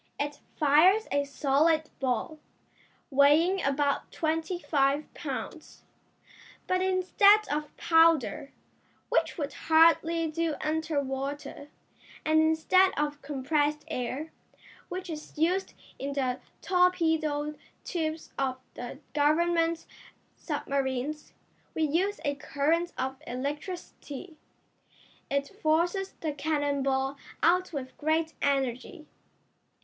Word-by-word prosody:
It 290 0 -3 0.2
fires 325 +9 +5
a 285 0 +1
solid 300 +3 +2
ball, 270 +5 -2 0.7
weighing 305 +7 +4
about 280 +1 0
twenty 325 +2 -1
five 285 -3 0
pounds, 300 +2 -7 0.8
but 370 0 +1
instead 380 +3 +4
of 300 0 -3
powder, 325 -5 +3 0.6
which - - +1
would 290 -3 -3
hardly 330 +1 +4
do 330 -1 -1
under 310 -1 -1
water, 275 +2 -5 0.6
and 315 0 +4
instead 320 +4 +4
of 295 0 -1
compressed 295 +2 -1
air, 260 +6 -3 0.6
which 370 +1 -5
is 310 -3 -8
used 360 +5 0 0.2
in 280 +1 -3
the 255 -3 -1 0.2
torpedo 320 -5 +2 0.3
tubes 320 -2 -3
of 260 -2 0 0.2
the 245 +2 -7 0.2
Government 330 +3 +2 0.5
submarines, 275 +2 -3 0.4
we 320 - +1
use 360 +7 +1
a 285 - +1
current 305 +4 0
of 265 +2 -3
electricity. 295 +4 -6 0.9
It 280 0 -1
forces 345 +5 +1
the 310 -2 -2
cannon 290 -1 -1
ball 270 0 0 0.3
out 360 +3 +3
with 265 -4 -6
great 315 +1 0
energy." 270 +2 -1
305 Hz, 105 wpm, -28 LUFS, 280-330 Hz, 0.9 s, fires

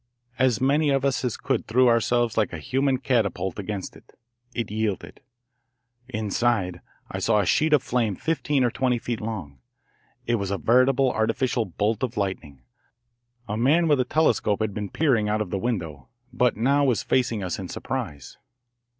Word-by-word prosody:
As 130 -4 +3
many 145 +3 +2
of 135 -1 +1
us 135 -1 0
as 125 -3 -1
could 135 -4 -2
threw 125 +3 +4
ourselves 120 0 +2
like 110 -4 +1
a - - -3
human 130 - 0
catapult 110 -8 -1
against 100 -1 -5
it. - - -19 0.3
It 115 -4 -4
yielded. 110 -2 -3 0.9
Inside 110 -5 -1 0.3
I - - -4
saw 110 -2 +2
a 100 - +1
sheet 155 - +2
of 150 -4 +4
flame 115 -5 0
fifteen 150 - 0
or 120 - +2
twenty 125 -1 +1
feet 115 -1 -4
long 95 - -6 0.7
it 120 0 +1
was 100 -2 -3
a 100 - -1
veritable 130 +3 +3
artificial 115 +1 0
bolt 105 +4 -1
of 125 -2 -3
lightning. 80 -10 -4 0.8
A 105 - -3
man 145 +9 +3
with 145 -3 +3
a - - +4
telescope 125 -7 +1
had 110 -2 -1
been 105 -1 -4
peering 120 -9 +1
out 105 +1 +1
of 105 -4 -3
the 95 - -1
window, 85 - -4 0.2
but 125 -3 +2
now 140 +5 +3
was 125 -5 +1
facing 120 -5 0
us 90 +1 -3
in 95 -2 -6
surprise. 70 -2 -5
115 Hz, 175 wpm, -25 LUFS, 100-130 Hz, 0.9 s, threw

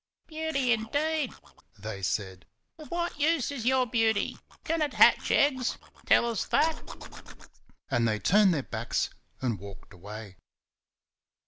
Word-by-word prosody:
"Beauty, 310 -5 -1
indeed!" 285 +6 0 0.5
they 105 -1 -7
said. 95 -1 -3 0.3
"Of 305 - -11
what 345 -3 -3
use 300 -2 +2
is 245 -4 -4
your 260 0 +3
beauty? 225 -2 +1 0.3
Can 330 0 -1
it 300 - -1
hatch - - +5
eggs? 260 -4 +2 0.3
Tell 235 - +5
us 230 -3 -1
that!" 320 0 +1 1.1
and 115 -1 +2
they 110 -1 +1
turned 195 - +4
their 150 -5 0
backs 115 -1 -2 0.3
and 115 -6 -1
walked 100 +1 -12
away. 100 +1 -10
225 Hz, 130 wpm, -28 LUFS, -, 1.1 s, hatch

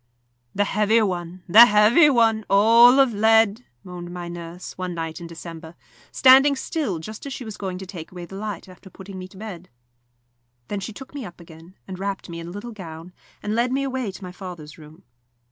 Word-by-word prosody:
"The 205 - +2
heavy 210 +2 +2
one, 180 -2 -4
the 220 +7 +9
heavy 215 +9 +5
one 225 -4 +3
all 230 +6 +6
of 265 -4 +4
lead," 220 +1 +3 0.2
moaned 175 -1 -8
my 175 -1 -6
nurse, 170 +1 -8
one 185 -1 -5
night 165 0 -5
in 170 - -7
December, 165 0 -10 0.4
standing 270 +2 +6
still, 270 - -3
just 215 - -8
as 275 - -5
she 255 - -7
was 215 -2 -7
going 190 -2 -5
to 190 - -8
take 175 -4 -9
away 175 -1 -8
the 185 - -14
light 205 -3 -6
after 185 +1 -15
putting 190 0 -10
me 185 - -8
to 190 - -17
bed. 185 -4 -9 1.0
Then 205 - -3
she 200 - -6
took 265 +6 -12
me 285 -2 -6
up 180 -5 -11
again, 165 +2 -15
and 185 -1 -7
wrapped 195 -2 -4
me 170 0 -7
in 165 - -8
a - - -8
little 205 +5 -7
gown, 170 -4 -10 0.3
and 210 - -2
led 240 +2 +1
me 275 +1 0
away 260 -5 -3
to 190 - -12
my 180 - -7
father's 180 -5 -10
room. 155 +3 -16
195 Hz, 210 wpm, -23 LUFS, 175-225 Hz, 1.0 s, the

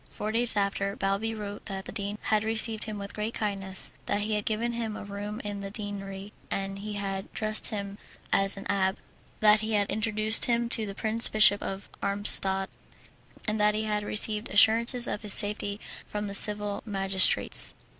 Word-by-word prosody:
Four 215 - -5
days 230 0 0
after, 200 0 -2
Balbi 200 +3 -2
wrote 205 -1 -8
that 195 -2 -7
the - - -7
dean 205 +1 -5
had 215 -1 0
received 220 0 0
him 215 -1 -7
with 200 0 -8
great 215 +2 -5
kindness, 195 -3 -3 0.2
that 205 - -1
he 215 +1 -3
had 210 -1 -2
given 230 +2 -2
him 230 -2 -5
a - - -8
room 205 +2 -7
in 205 -1 -6
the 200 0 -7
deanery, 200 -1 -8 0.2
that 195 0 -4
he 210 +1 -7
had 195 -1 -5
dressed 215 0 0
him 200 -1 -6 0.3
as 195 0 +1
an 195 - -8
abbé, 190 -1 -1 0.5
that 215 0 +5
he 220 0 -4
had 205 -1 +1
introduced 215 0 +3
him 235 -1 -1
to 220 -3 -4
the 195 - -8
Prince 220 +2 +4
Bishop 210 -1 +4
of 195 +1 -7
Armstadt, 195 -1 +2 0.8
and 215 0 -1
that 210 0 +2
he 215 - -2
had 210 -1 -2
received 210 +1 -1
assurances 230 +4 +5
of 210 - -4
his 210 -2 +2
safety 205 -1 +1 0.3
from 210 0 -5
the 200 - -6
civil 205 0 +5
magistrates. 195 -3 +4
210 Hz, 185 wpm, -27 LUFS, 200-215 Hz, 0.8 s, that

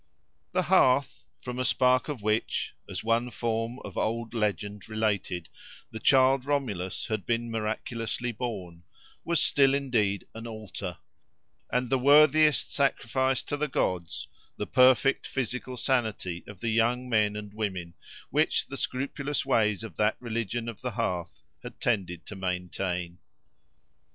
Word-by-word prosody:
The - - +2
hearth, 130 +1 +3 0.2
from 125 0 -5
a - - +1
spark 130 +1 +3
of 135 -8 -5
which, 110 +1 0 0.2
as - - -4
one 115 +2 +1
form 115 0 -2
of - - -5
old 115 +1 -2
legend 105 -2 -2
related, 100 -6 -1 0.4
the 110 - -6
child 130 +2 +5
Romulus 120 -11 -2
had 110 -3 -2
been 115 0 -1
miraculously 115 +2 -2
born, 100 -8 -5 0.4
was 170 -2 +1
still 135 -1 +4
indeed 115 -8 0
an 115 +1 -7
altar; 110 -9 -6 0.7
and 125 -1 0
the 135 - +3
worthiest 150 +2 +5
sacrifice 130 -2 +1
to 145 - -2
the 150 +1 -1
gods 85 - -2 0.3
the - - -2
perfect 130 +1 +4
physical 125 0 -3
sanity 110 -9 -1
of 100 -3 -11
the 115 - 0
young 120 +3 +2
men 105 -3 +2
and 105 -1 -7
women, 95 -6 -3 0.4
which - - +2
the - - -6
scrupulous 140 +2 -2
ways 110 -5 +2
of 115 - -9
that 105 +1 +2
religion 115 -1 -3
of 115 -3 -7
the 125 - -2
hearth 85 -9 -2 0.2
had - - -10
tended 90 -4 -1
to 105 - -8
maintain. 90 -1 -3
115 Hz, 140 wpm, -28 LUFS, 100-130 Hz, 0.7 s, child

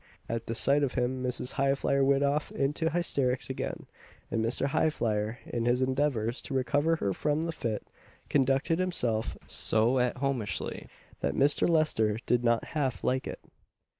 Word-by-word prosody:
At 115 0 -4
the 115 - -2
sight 140 +5 +3
of 140 -3 -1
him 125 +1 -1
Mrs. 125 0 -1
Highflyer 140 0 +2
went 140 +1 +3
off 145 +2 0
into 150 +4 0
hysterics 135 -7 0
again, 130 - -5 0.5
and 115 - 0
Mr. 115 +4 +2
Highflyer, 110 -7 0
in 115 -1 -3
his 125 +2 +2
endeavours 130 -3 0
to 135 - -5
recover 145 +6 +2
her 100 -11 -1
from 150 - 0
the 165 - -2
fit, 115 -9 -3 0.4
conducted 135 +5 +2
himself 125 -12 0
so 115 +4 +2
at 125 0 0
homeishly, 130 -5 -2 0.3
that 70 0 -1
Mr. 145 +4 +3
Lester 130 -10 +2
did 120 0 +2
not 115 -1 +1
half 135 -5 -1
like 130 +1 0
it. - - -7
130 Hz, 160 wpm, -29 LUFS, 115-145 Hz, 0.5 s, sight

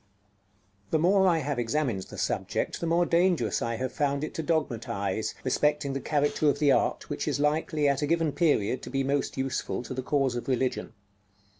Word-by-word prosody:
The - - +2
more 190 +4 +4
I 170 -2 +4
have 145 -4 -2
examined 120 -3 0
the - - -11
subject - - -2
the 170 - -1
more 170 +1 +3
dangerous 170 - +2
I 115 0 -1
have 130 +2 -3
found 140 0 0
it 155 - -4
to - - -3
dogmatize 110 - -2
respecting 150 +2 +1
the 135 - -2
character 145 0 +1
of - - +1
the 145 -2 +3
art - - +1
which - - -3
is - - 0
likely, 150 0 +1
at 140 0 +1
a 145 - 0
given 165 -1 +1
period, 135 - +1
to - - -8
be 135 +1 0
most 140 +1 -1
useful 135 -2 -2
to 130 - -6
the 130 - -3
cause 135 -2 0
of 120 - -5
religion. 130 -3 -1
145 Hz, 195 wpm, -28 LUFS, 130-155 Hz, -, more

